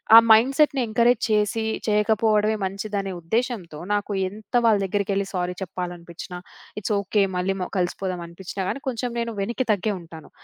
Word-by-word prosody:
ఆ - - +13
మైండ్‌‌సెట్‌ని 270 +4 +5
ఎంకరేజ్ 235 +2 +3
చేసి 210 +2 +1 0.2
చేయకపోవడమే 215 0 +3
మంచిదనే 195 0 -3
ఉద్దేశ్యంతో, 190 -5 -2
నాకు 205 0 -1 0.2
ఎంత 215 +4 -14
వాళ్ళ 220 -2 +5
దగ్గరికెళ్లి 200 0 -1
సారీ 180 0 -2
చెప్పాలనిపిచ్చినా, 175 0 -6 0.4
ఇట్స్ 210 - -1
ఓకే. 200 +1 +1
మళ్ళీ 190 +2 0
మ - - -2
కలిసిపోదాం 180 0 -2
అనిపిచ్చినా 190 +2 -6
గాని 275 - -3
కొంచెం 245 0 -2
నేను 235 -1 -2
వెనక్కి 235 +5 -2
తగ్గే 205 +1 -1
ఉంటాను. 160 -2 -12
205 Hz, 145 wpm, -24 LUFS, 180-220 Hz, 0.4 s, ఆ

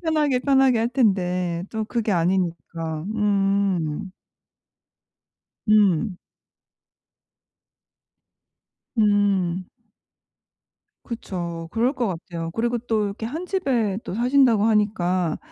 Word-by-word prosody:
편하게 300 -5 +1
편하게 265 -2 +3
할 230 - +1
텐데 180 -8 0
또 220 -1 -2
그게 225 -2 -1
아니니까. 170 -3 -1
음. 195 -5 0 1.6
음. 205 -2 +3 2.8
음. 200 -4 +2 1.4
그쵸. 170 -8 -5
그럴 240 +4 +1
것 250 -4 -1
같아요. 170 -2 -5
그리고 235 +3 0
또 225 -2 -1
이렇게 205 +2 -4
1 315 +9 -5
집에 245 - 0
또 - - -5
사신다고 245 -2 +3
하니까 185 -6 +1
205 Hz, 170 characters per minute, -23 LUFS, 180-235 Hz, 2.8 s, 편하게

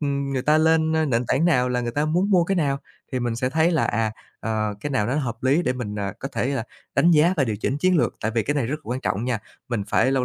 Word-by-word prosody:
ừm, 140 -1 -1
người 130 -2 -1
ta 155 +1 +4
lên, 160 0 +3
a, 160 - +2
nền 120 -4 0
tảng 135 +6 +1
nào 125 -7 +3
là 125 0 0
người 120 -1 -2
ta 145 +3 0
muốn 180 +6 +1
mua 180 -3 +4
cái 195 +1 0
nào, 140 -4 +1 0.3
thì 130 - -1
mình 120 -1 -1
sẽ 130 +1 -1
thấy 160 +4 +3
là, 160 - +2
à, 110 0 0 0.3
ờ, 110 -2 -1
cái 145 - -4
nào 105 -6 +1
nó 125 - -1
hợp 120 -6 -3
lý 140 +7 +3
để 125 - +1
mình, 115 -5 -5
à, 100 -1 -2
có 135 - -5
thể - - 0
là 135 -5 -1 0.3
đánh 175 - +4
giá 165 +3 +4
và 140 - +3
điều 110 -3 -2
chỉnh 130 +6 -2
chiến 185 +2 +3
lược, - - +1
tại 110 - -1
vì 115 -1 0
cái 145 - -1
này 135 -6 0
rất 150 +5 -2
quan 125 +2 -3
trọng 110 0 -1
nha. 125 -3 0 0.3
Mình 115 -5 -1
phải 130 - +3
lâu 130 -2 +1
135 Hz, 300 wpm, -23 LUFS, 120-155 Hz, 0.3 s, ta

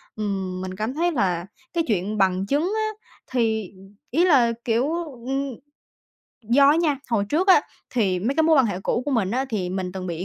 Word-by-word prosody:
ừm, 190 -3 -3
mình 185 0 -5
cảm 215 +6 -3
thấy 345 +3 +1
là 180 - 0 0.3
cái 335 - +1
chuyện 210 0 -1
bằng 190 -1 +2
chứng 300 - 0
á, 435 0 0 0.4
thì 220 -5 0 0.4
ý 330 +7 +3
là, 260 -9 +5
kiểu, 245 +5 +1 0.3
ừm 270 -1 -2 0.9
do 275 +4 +6
á 300 - +3
nha, 320 -4 +2
hồi 210 -4 +2
trước 345 - +1
á, 375 - +8 0.3
thì 195 -7 +1
mấy 235 +9 -1
cái 320 - +3
mối 320 -1 +4
quan 265 - +5
hệ 190 -3 -3
cũ 240 - 0
của 290 - -2
mình 220 -8 +1
á 260 +3 0
thì 190 -5 -2
mình 185 -1 -3
từng 185 -1 -5
bị 170 +1 -4
230 Hz, 205 wpm, -23 LUFS, 190-280 Hz, 0.9 s, á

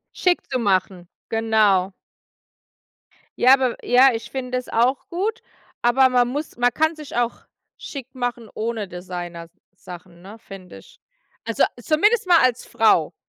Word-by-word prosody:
Schick 360 -1 +1
zu 255 - 0
machen, 185 -4 -1 0.2
genau. 215 -4 +2 1.5
Ja, 255 +2 +6
aber 260 -3 +1
ja, 255 +2 +5
ich 225 - -6
finde 255 -2 -6
das 250 - -6
auch 245 +4 0
gut, 410 +6 -3 0.4
aber 255 +2 +4
man 245 -1 +2
muss 290 +5 -5
man 245 0 +2
kann 315 +5 0
sich 305 -2 -10
auch 240 0 -2 0.3
schick 265 -3 -9
machen 245 -3 -4
ohne 220 -2 -3
Designersachen, 175 0 -10
ne, 205 +4 -12
finde 195 -4 -12
ich. - - -18 0.4
Also, - - 0
a - - +4
zumindest 415 +7 +2
mal 350 -2 +6
als 250 -1 +1
Frau, 175 -7 +2
240 Hz, 145 wpm, -22 LUFS, 195-265 Hz, 1.5 s, Ja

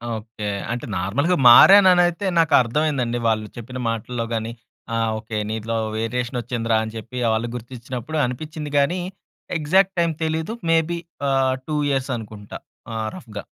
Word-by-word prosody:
Okay. 110 -1 -7 0.2
అంటే, 120 - -4
నార్మల్‌గా 140 - +1
మారాననైతే 180 +4 +7
నాకర్థమైందండి. 135 -4 +2
వాళ్ళు 110 -1 0
చెప్పిన 125 +2 -7
మాటల్లో 115 +1 -3
గాని 115 0 -2 0.4
అహ్, 115 -1 +1
ఓకే 110 0 -5
నీలో 110 +1 -3 0.2
వేరియేషన్ 125 +3 -2
వచ్చిందిరా, 115 -2 -1
అని 110 0 -6
చెప్పి 120 +3 -8 0.2
వాళ్ళు 110 +2 -1
గుర్తించినప్పుడు 125 +4 -6
అనిపిచ్చింది 150 +4 -5
గానీ, 170 +6 +2 0.6
ఎగ్జాక్ట్ 190 +5 +2
టైం 170 -1 +2
తెలీదు. 160 +7 -2
మేబి 165 +1 +2 0.3
ఆహ్, 135 -1 +2
2 155 - -1
ఇయర్స్ 135 -1 -1
అనుకుంటా 105 -2 -9 0.4
ఆహ్, 110 -1 -2
రఫ్‌గా. 105 - -9
125 Hz, 135 wpm, -22 LUFS, 115-155 Hz, 0.6 s, మారాననైతే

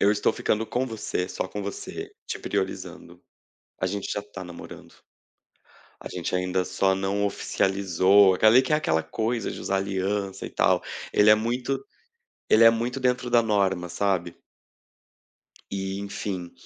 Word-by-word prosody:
"Eu 100 - +5
estou 105 0 +2
ficando 110 +1 -1
com 125 +4 -1
você, 105 -5 -3
só - - -3
com 105 - -5
você, 100 - -6
te - - -4
priorizando, - - -4 0.6
a 95 - +1
gente 100 +1 -3
já 105 - -2
tá 105 -2 -9
namorando. 90 -1 -11 1.1
A - - -7
gente 90 0 -4
ainda 90 0 0
só 95 0 +1
não 100 +1 -1
oficializou", 95 -1 +3
aqueli 110 +7 +6
que 130 - -3
é 150 - +6
aquela 80 - +1
coisa 115 0 -2
de - - -7
usar 95 - -1
aliança 95 0 -2
e - - -8
tal. - - +2 0.3
Ele 105 +1 +5
é - - +9
muito 125 - -2 0.7
ele 110 - +6
é 115 - +10
muito 120 +3 -1
dentro 125 -1 0
da 120 -1 +5
norma, 95 -5 0
sabe. 90 -3 -1 1.4
E 95 0 -3
enfim, 100 -3 -5
100 Hz, 155 wpm, -25 LUFS, 95-110 Hz, 1.4 s, é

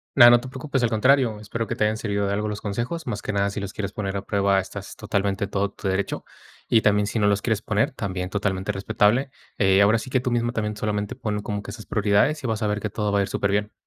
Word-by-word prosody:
Nada, 120 -3 +10
no 120 0 +6
te 130 - -8
preocupes, 135 -1 -2
al 115 - +3
contrario, 120 0 +3
espero 110 +2 -4
que - - -3
te 105 - +2
hayan 110 +1 +1
servido 100 -2 -1
de 100 - 0
algo 105 +1 -1
los 105 - -4
consejos. 120 +10 -4
Más 105 -3 -3
que - - -3
nada, 100 -1 +1
si 100 +1 -5
los 100 -1 -5
quieres 100 -2 -4
poner 100 -2 -3
a 100 - -6
prueba, 100 -1 +2
estás 100 +1 -7
totalmente 100 -2 -1
en - - -11
todo 100 0 -1
tu 100 - -6
derecho, 95 +1 -1 0.4
y 115 - +4
también, 105 -1 +3
si 110 - -3
no 105 -2 +3
los 100 -1 +2
quieres 110 -1 0
poner, 105 -1 0
también 95 -6 -4
totalmente 100 0 -1
respetable. 110 +6 +1 0.3
Eh, 95 -1 +4
ahora 105 +3 +5
sí 130 - -7
que 130 - +2
tú 125 - -2
misma 120 0 0
también, 105 -3 -2
solamente 105 -1 -2
ponlo 105 -1 -3
como 105 -1 -3
que 100 - -7
en - - -7
sus 110 - -11
prioridades 105 +9 +2
y 125 - -1
vas 110 0 -2
a 105 - +1
ver 105 0 -1
que 110 - -2
todo 105 0 -2
va 100 - +3
a - - +3
ir 95 - -1
superbién. 105 +1 0
105 Hz, 275 wpm, -24 LUFS, 100-115 Hz, 0.4 s, Nada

